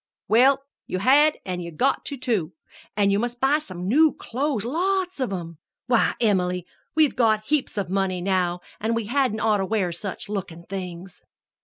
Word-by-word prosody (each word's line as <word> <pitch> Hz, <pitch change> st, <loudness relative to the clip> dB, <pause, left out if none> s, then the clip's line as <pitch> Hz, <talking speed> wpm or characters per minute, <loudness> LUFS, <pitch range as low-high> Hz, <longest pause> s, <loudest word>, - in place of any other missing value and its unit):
"Well, 265 Hz, +5 st, +4 dB, 0.2 s
you -, -, -2 dB
had 285 Hz, +9 st, +5 dB
an' 180 Hz, -1 st, -3 dB
you've 170 Hz, -3 st, -7 dB
got 275 Hz, +1 st, +1 dB
to, 280 Hz, -, -3 dB
too. 200 Hz, -10 st, -1 dB, 0.4 s
An' 200 Hz, -1 st, +3 dB
you 200 Hz, -, +2 dB
must 240 Hz, +1 st, -3 dB
buy 275 Hz, +4 st, +3 dB
some 185 Hz, -, -7 dB
new 305 Hz, +8 st, +5 dB
clothes 260 Hz, -3 st, -2 dB
lots 370 Hz, +5 st, 0 dB
of 255 Hz, -6 st, -1 dB
'em! 170 Hz, -4 st, -6 dB, 0.3 s
Why, 240 Hz, -2 st, +2 dB
Em'ly, 180 Hz, -5 st, +1 dB, 0.3 s
we've 310 Hz, -3 st, +3 dB
got 215 Hz, -3 st, +2 dB
heaps 290 Hz, -5 st, -1 dB
of 200 Hz, -3 st, -1 dB
money 190 Hz, 0 st, 0 dB
now, 180 Hz, -1 st, 0 dB, 0.2 s
an' 225 Hz, +2 st, 0 dB
we 230 Hz, -2 st, -1 dB
hadn't 250 Hz, -2 st, 0 dB
oughter 210 Hz, -3 st, +2 dB
wear 190 Hz, -3 st, 0 dB
such 195 Hz, +4 st, -5 dB
lookin' 190 Hz, -5 st, -5 dB
things." 180 Hz, -1 st, -7 dB
210 Hz, 175 wpm, -24 LUFS, 185-265 Hz, 0.4 s, had